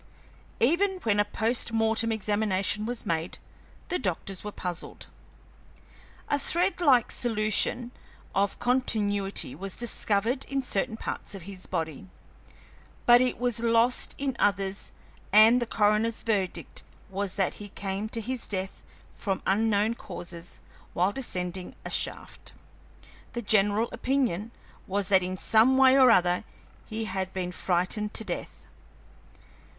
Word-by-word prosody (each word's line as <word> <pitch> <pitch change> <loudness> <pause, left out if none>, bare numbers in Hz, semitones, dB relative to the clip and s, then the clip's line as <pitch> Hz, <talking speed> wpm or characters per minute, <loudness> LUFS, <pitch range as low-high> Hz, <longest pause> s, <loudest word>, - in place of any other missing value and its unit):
Even 370 +9 +2
when 205 -2 +2
a 205 - +4
post 225 +3 +1
mortem 225 0 +1
examination 210 -1 0
was 240 -1 -4
made, 165 +1 -2 0.5
the 360 - -1
doctors 185 -2 -3
were 210 - -5
puzzled. 180 -3 -5 1.2
A 285 - +1
threadlike 335 - +3
solution 225 +1 +2 0.4
of 200 0 0
continuity 205 - +1
was 190 +6 -4
discovered 235 +1 0
in 275 -1 -2
certain 220 0 -1
parts 210 - -5
of 190 - -8
his 190 -1 -7
body, 155 - -4 1.0
but 240 0 +7
it 255 -1 0
was 245 -2 0
lost 230 +1 +2
in 275 -2 -2
others, 195 -1 0 0.4
and 220 +4 +7
the 240 - -2
coroner's 215 +1 +1
verdict 200 -5 -2 0.3
was 195 -1 -1
that 190 -3 0
he 205 - -8
came 195 +2 -4
to 230 - -2
his 250 +2 -2
death 190 -1 -4 0.3
from 195 -3 -3
unknown 210 +2 +2
causes 175 -5 -8 0.4
while 180 +3 +2
descending 185 -7 -4
a - - -5
shaft. - - -2 0.8
The 240 -1 -4
general 205 +2 +2
opinion 245 -5 -1 0.4
was 200 0 -1
that 190 -2 +5
in 185 +1 -3
some 225 +7 +4
way 265 0 +6
or 260 -2 +7
other 180 -4 +3 0.4
he 220 +1 -4
had 190 -2 -3
been 180 -1 -3
frightened 185 +4 -1
to - - +1
death. 180 -5 -6
210 Hz, 130 wpm, -27 LUFS, 190-235 Hz, 1.2 s, but